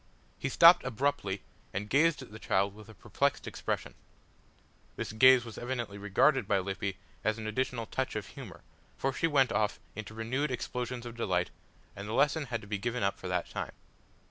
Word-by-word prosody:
He 140 - -1
stopped 170 +5 +8
abruptly 125 -6 -1 0.3
and 100 +2 -2
gazed 145 +4 +3
at 125 - -13
the 110 - -9
child 100 -2 +1
with 105 0 -13
a 110 - -12
perplexed - - -1
expression. - - -3 1.0
This - - -4
gaze 130 +2 +7
was 115 - -8
evidently 120 -5 -4
regarded 105 +8 +3
by 100 - +3
Lippy 95 0 -3 0.3
as 110 0 +1
an 110 - -6
additional 115 +1 -1
touch 130 +2 -2
of 105 -2 -3
humour, 120 -11 -10 0.3
for 135 0 0
she 165 - +1
went 135 -6 +3
off 105 -1 0 0.2
into 110 0 -7
renewed 130 +7 -1
explosions 125 0 -3
of 120 -1 -7
delight 115 - 0 0.4
and 100 +1 -7
the 110 - -4
lesson 150 +4 +3
had 115 -4 -3
to 105 - -12
be 105 -1 -2
given 120 +1 -2
up 100 - 0
for 95 - -6
that 90 -1 -1
time. - - -4
115 Hz, 190 wpm, -31 LUFS, 105-130 Hz, 1.0 s, stopped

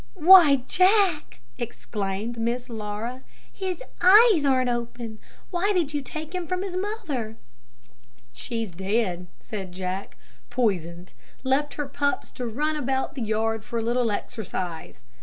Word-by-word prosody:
"Why, 315 -7 +8
Jack!" 370 - +3 0.2
exclaimed 220 -1 -4
Miss 240 +2 -2
Laura, 220 +3 -5 0.3
"his 380 +4 -4 0.2
eyes 400 -1 +7
aren't 260 -2 +3
open; 235 -2 -5 0.3
why 385 +3 +1
did 330 -6 0
you 290 - -1
take 310 +4 -7
him 360 -2 -3
from 365 +2 -1
his 380 -2 -4
mother?" 365 - -3 1.0
"She's 215 - -4
dead," 190 0 -1
said 195 -4 -6
Jack. 185 +1 -5 0.3
"Poisoned 185 -8 -1 0.3
left 275 +3 +1
her 295 -1 -3
pups 285 +1 -1
to 245 - -5
run 300 +7 -1
about 270 -2 -1
the 270 - -6
yard 225 0 0
for 235 +1 -4
a 225 - -1
little 240 0 +1
exercise. 185 - -5
245 Hz, 135 wpm, -25 LUFS, 215-310 Hz, 1.0 s, Why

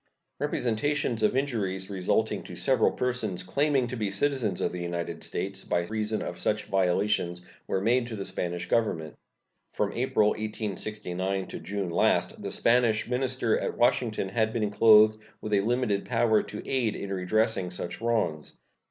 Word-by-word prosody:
Representations 125 0 0
of 110 +4 +2
injuries 100 -9 -1
resulting 100 +3 0
to 90 - -8
several 110 +8 +3
persons 115 -8 -2
claiming 140 +6 +1
to 120 +1 -5
be 105 -4 -1
citizens 110 -2 0
of - - 0
the 90 - -5
United 85 -1 -4
States 95 0 -2
by 85 - 0
reason 110 +3 -2
of - - -6
such 105 0 0
violations 90 -1 0 0.2
were 95 - 0
made 120 +3 +2
to 115 - -5
the 100 -2 -5
Spanish 85 0 -3
Government. 85 -9 0 0.6
From - - -1
April, 105 0 +2
1869, 100 -3 -3
to - - -6
June 100 -3 -3
last - - +1
the - - -4
Spanish 115 -2 +2
minister 125 -2 0
at - - -3
Washington 115 -4 +1
had 110 +1 +1
been 105 -3 -1
clothed 110 0 +6 0.2
with 105 - -4
a 100 - +4
limited 115 -2 0
power 115 -3 +3
to 105 - -8
aid 125 -5 0
in 100 0 -4
redressing 95 +1 +1
such 90 +2 -6
wrongs. 105 -10 -1
105 Hz, 160 wpm, -28 LUFS, 95-115 Hz, 0.6 s, clothed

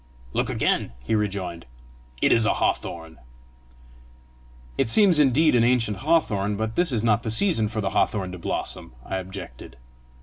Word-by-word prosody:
"Look - - 0
again," - - 0
he 110 - -2
rejoined: 95 -6 -2 0.6
"it - - +4
is 115 -1 +4
a - - +2
hawthorn." 80 -1 -3 1.6
"It 135 - 0
seems 190 - +5
indeed 150 +3 +4
an 120 -2 +4
ancient 115 -4 +1
hawthorn; 110 -10 +1
but 110 +1 -3
this 175 +4 0
is 115 -3 -1
not 110 -1 +2
the 115 - -4
season 115 - +2
for 110 0 -3
the 95 - -2
hawthorn 95 -4 0
to 90 - -8
blossom!" 75 - -4
I 95 - -3
objected. 95 -9 -9
110 Hz, 160 wpm, -24 LUFS, 95-125 Hz, 1.6 s, seems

